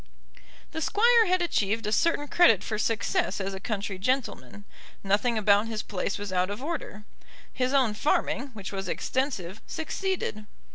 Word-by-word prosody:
The 320 Hz, -, -4 dB
Squire 455 Hz, +5 st, +4 dB
had 365 Hz, 0 st, +2 dB
achieved 220 Hz, -, 0 dB
a 210 Hz, -, -1 dB
certain 295 Hz, +3 st, +2 dB
credit 225 Hz, -, +5 dB
for 215 Hz, -, -3 dB
success 205 Hz, -3 st, 0 dB
as 195 Hz, 0 st, -3 dB
a 190 Hz, -, -5 dB
country 200 Hz, -2 st, -4 dB
gentleman. 235 Hz, -2 st, -2 dB, 0.4 s
Nothing 210 Hz, +4 st, +1 dB
about 205 Hz, +1 st, +4 dB
his 220 Hz, -2 st, -3 dB
place 195 Hz, 0 st, -3 dB
was 205 Hz, -2 st, -5 dB
out 185 Hz, +1 st, +1 dB
of 205 Hz, +6 st, -5 dB
order. 290 Hz, -, -5 dB, 0.5 s
His 255 Hz, 0 st, 0 dB
own 260 Hz, -6 st, +3 dB
farming, 250 Hz, +5 st, 0 dB
which 200 Hz, -3 st, -7 dB
was 195 Hz, -1 st, -4 dB
extensive, 225 Hz, -7 st, -2 dB
succeeded. 320 Hz, -, -3 dB
215 Hz, 155 wpm, -27 LUFS, 200-280 Hz, 0.5 s, credit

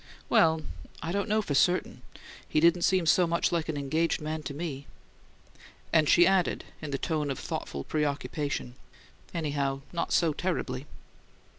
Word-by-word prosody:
"Well 160 Hz, -1 st, +4 dB, 0.4 s
I 165 Hz, -, -2 dB
don't 200 Hz, +3 st, -1 dB
know 215 Hz, +1 st, +2 dB
for 150 Hz, -, -2 dB
certain. 180 Hz, +6 st, +2 dB, 0.5 s
He 155 Hz, -, +2 dB
didn't 170 Hz, +2 st, +4 dB
seem 185 Hz, -1 st, +3 dB
so 175 Hz, +2 st, +4 dB
much 170 Hz, 0 st, +1 dB
like 165 Hz, -2 st, -1 dB
an 155 Hz, -, -2 dB
engaged 155 Hz, +4 st, 0 dB
man 155 Hz, 0 st, -4 dB
to 145 Hz, -, -6 dB
me." 145 Hz, -4 st, -5 dB, 1.1 s
And 155 Hz, -2 st, +4 dB
she 175 Hz, -, +7 dB
added, 190 Hz, -2 st, +2 dB, 0.2 s
in 155 Hz, -, -5 dB
the 140 Hz, -, -1 dB
tone 155 Hz, -1 st, -1 dB
of 135 Hz, -, -2 dB
thoughtful 70 Hz, -, -5 dB
preoccupation: 145 Hz, -, -2 dB, 0.6 s
"Anyhow 140 Hz, -4 st, -1 dB
not 170 Hz, -, -2 dB
so 165 Hz, -3 st, +3 dB
terribly!" 145 Hz, -6 st, -3 dB
155 Hz, 155 wpm, -29 LUFS, 145-170 Hz, 1.1 s, she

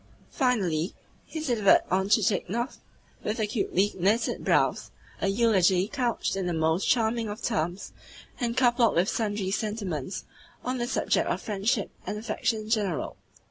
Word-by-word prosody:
Finally, 195 Hz, -, 0 dB, 0.3 s
he 320 Hz, -, -6 dB
delivered 240 Hz, -10 st, +4 dB
on 190 Hz, +1 st, +1 dB
Chichikov, 220 Hz, +3 st, +1 dB, 0.4 s
with 215 Hz, +2 st, -2 dB
acutely 210 Hz, -2 st, +1 dB
knitted 205 Hz, +6 st, +1 dB
brows, -, -, +2 dB, 0.3 s
a -, -, +1 dB
eulogy 195 Hz, -3 st, +3 dB
couched 245 Hz, -4 st, -1 dB
in 190 Hz, -2 st, -2 dB
the 175 Hz, -, -1 dB
most 160 Hz, +3 st, +1 dB
charming 225 Hz, -1 st, +2 dB
of 205 Hz, +2 st, -5 dB
terms, 175 Hz, +5 st, -2 dB, 0.5 s
and 240 Hz, -1 st, -1 dB
coupled 240 Hz, -3 st, +4 dB
with 175 Hz, +3 st, +3 dB
sundry 205 Hz, -4 st, -1 dB
sentiments 200 Hz, -, -3 dB, 0.4 s
on 255 Hz, 0 st, -2 dB
the 240 Hz, -, -1 dB
subject -, -, +1 dB
of -, -, 0 dB
friendship 205 Hz, 0 st, -1 dB, 0.2 s
and 210 Hz, -, -2 dB
affection 220 Hz, 0 st, -1 dB
in 215 Hz, -, -9 dB
general. 200 Hz, -, 0 dB
210 Hz, 140 wpm, -27 LUFS, 190-235 Hz, 0.5 s, delivered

